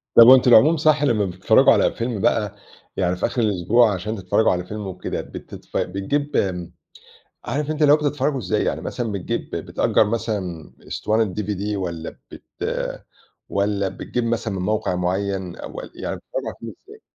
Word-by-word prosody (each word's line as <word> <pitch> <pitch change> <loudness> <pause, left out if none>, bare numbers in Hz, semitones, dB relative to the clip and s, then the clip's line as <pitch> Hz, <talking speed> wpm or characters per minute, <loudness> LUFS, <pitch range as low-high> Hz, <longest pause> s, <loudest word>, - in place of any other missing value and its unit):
طَب 115 - +10
وأنتم 130 -1 +7
العموم 155 +8 +7
صح 150 -1 +3
لما 115 -7 +2
بتتفرجوا 95 0 +4
على - - +3
فيلم 115 -3 -3
بقى 105 0 +1 0.4
يعني 90 0 +1
في 90 - -1
آخر 125 - -1
الأسبوع، 105 +2 +3
عشان 105 +4 -3
تتفرجوا 95 +2 +2
على 90 0 -2
فيلم 105 +1 -6
وكده 90 -1 -4
بتتف - - -8
بتجيب 140 +10 -2
آمم، 90 -3 -1 0.7
عارف 150 +1 -2
أنت 155 0 -2
اللي 145 -1 +7
هو - - +7
بتتفرجوا 145 -2 -1
إزاي؟ 95 -7 -1
يعني - - -1
مثلًا 120 -4 -4
بتجيب 95 -3 -3
بتأجر - - +1
مثلًا 100 -7 -3 0.2
إسطوانة 110 -3 0
DVD 105 0 -2
والّا 85 -4 -5
بت - - -11 1.1
والّا 100 -1 0
بتجيب 115 +5 -4
مثلًا 115 -3 -1
من 90 - -3
موقع 105 -2 0
معين 95 0 -2
أو - - -9
و - - -3
يعني - - -4
بتتفرجوا - - -6
على - - -6
الفيلم - - -9
إزاي؟ 430 +1 -13
105 Hz, 170 wpm, -22 LUFS, 95-125 Hz, 1.1 s, طَب